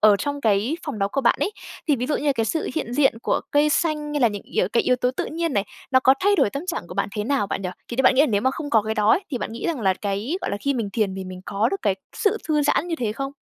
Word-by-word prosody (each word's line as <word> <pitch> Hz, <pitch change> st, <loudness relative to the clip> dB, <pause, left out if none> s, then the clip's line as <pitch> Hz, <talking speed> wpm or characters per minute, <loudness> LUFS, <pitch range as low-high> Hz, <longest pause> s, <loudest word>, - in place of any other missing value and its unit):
ở 210 Hz, -1 st, +6 dB
trong 285 Hz, +6 st, -3 dB
cái 220 Hz, +5 st, +1 dB
phòng 260 Hz, -8 st, -4 dB
đó 195 Hz, 0 st, +1 dB
của 275 Hz, -, -1 dB
bạn 240 Hz, -, +3 dB
ấy, 410 Hz, -, 0 dB, 0.4 s
thì 290 Hz, -, +4 dB
ví 250 Hz, -, -2 dB
dụ 295 Hz, -, 0 dB
như 300 Hz, -, -3 dB
là 285 Hz, -, +4 dB
cái 230 Hz, -3 st, 0 dB
sự 315 Hz, +8 st, -1 dB
hiện 270 Hz, -7 st, -3 dB
diện 270 Hz, -4 st, +3 dB
của -, -, +1 dB
cây 290 Hz, +1 st, +4 dB
xanh 300 Hz, -2 st, 0 dB
hay 290 Hz, -, 0 dB
là 240 Hz, -, +5 dB
những 205 Hz, -2 st, -6 dB
yếu 180 Hz, -, -1 dB
cái 235 Hz, -, +3 dB
yếu 250 Hz, -, +2 dB
tố 250 Hz, 0 st, +1 dB
tự 260 Hz, -, -3 dB
nhiên 330 Hz, 0 st, -2 dB
này, 200 Hz, -4 st, +1 dB, 0.3 s
nó 260 Hz, -1 st, +5 dB
có 260 Hz, +1 st, +5 dB
thay 405 Hz, +1 st, +3 dB
đổi 205 Hz, -, +3 dB
tâm 280 Hz, -, -5 dB
trạng 345 Hz, -, -3 dB
của 180 Hz, -, -9 dB
bạn 200 Hz, -, 0 dB
thế 210 Hz, -, -1 dB
nào 270 Hz, -5 st, +1 dB
bạn 195 Hz, -, -3 dB
nhỉ? 180 Hz, -, -2 dB, 0.2 s
Thì 235 Hz, -, -5 dB
như 265 Hz, -, +2 dB
bạn 260 Hz, -, +5 dB
nghĩ 265 Hz, -, +4 dB
là -, -, +3 dB
nếu 205 Hz, -6 st, +1 dB
mà 260 Hz, -, +2 dB
không 290 Hz, +2 st, -6 dB
có 220 Hz, -2 st, +4 dB
cái 220 Hz, +1 st, -2 dB
đó 210 Hz, -1 st, +3 dB
ấy, 375 Hz, -, +3 dB
thì 255 Hz, -, -2 dB
bạn 215 Hz, -, -4 dB
nghĩ 230 Hz, -, -4 dB
rằng 325 Hz, -7 st, -1 dB
là 190 Hz, -3 st, +2 dB
cái, 205 Hz, -, -2 dB
gọi -, -, -3 dB
là, -, -, -1 dB
khi 280 Hz, -1 st, 0 dB
mình 225 Hz, -5 st, -2 dB
thiền 200 Hz, -2 st, 0 dB
thì 190 Hz, 0 st, -5 dB
mình 185 Hz, 0 st, -8 dB
có 205 Hz, +3 st, 0 dB
được 390 Hz, -, -4 dB
cái 200 Hz, -, +2 dB, 0.2 s
sự 425 Hz, 0 st, +1 dB
thư 300 Hz, -1 st, +2 dB
giãn 295 Hz, +3 st, +1 dB
như 335 Hz, -, 0 dB
thế 225 Hz, -6 st, -1 dB
không? 275 Hz, +3 st, -4 dB
250 Hz, 340 wpm, -23 LUFS, 210-295 Hz, 0.4 s, ở